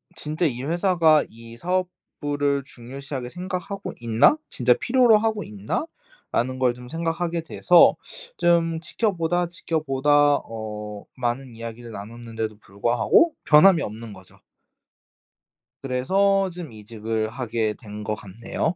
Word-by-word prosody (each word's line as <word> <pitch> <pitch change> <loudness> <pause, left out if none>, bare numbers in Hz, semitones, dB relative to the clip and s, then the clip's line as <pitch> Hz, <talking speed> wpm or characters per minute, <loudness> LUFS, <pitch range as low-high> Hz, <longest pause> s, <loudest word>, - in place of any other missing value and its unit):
'진짜 155 +2 -2
이 125 -3 -1
회사가 165 -1 +3
이 115 +1 -13
사업부를 145 -5 -2
중요시하게 130 +1 -7
생각하고 185 +3 -5
있나? 115 - +4
진짜 125 0 +3
필요로 240 - +4
하고 220 -1 -1
있나?'라는 130 - -4
걸 125 -2 +3
좀 125 0 -12
생각하게 165 +2 -2
돼서 175 +1 +5 0.4
좀 165 -1 +2
지켜보다, 175 -2 -1
지켜보다 145 -3 +2
어 105 -2 -7
많은 125 0 -3
이야기를 115 +1 -8
나눴는데도 110 0 -6
불구하고 120 - +2
변함이 160 +2 +7
없는 110 0 -7
거죠. 95 -1 -16 1.4
그래서 190 +10 +2
좀 170 -6 -8
이직을 110 +1 -3
하게 115 -3 -2
된 105 -1 -9
것 105 +1 -2
같네요. 115 - -3
135 Hz, 280 characters per minute, -24 LUFS, 115-170 Hz, 1.4 s, 변함이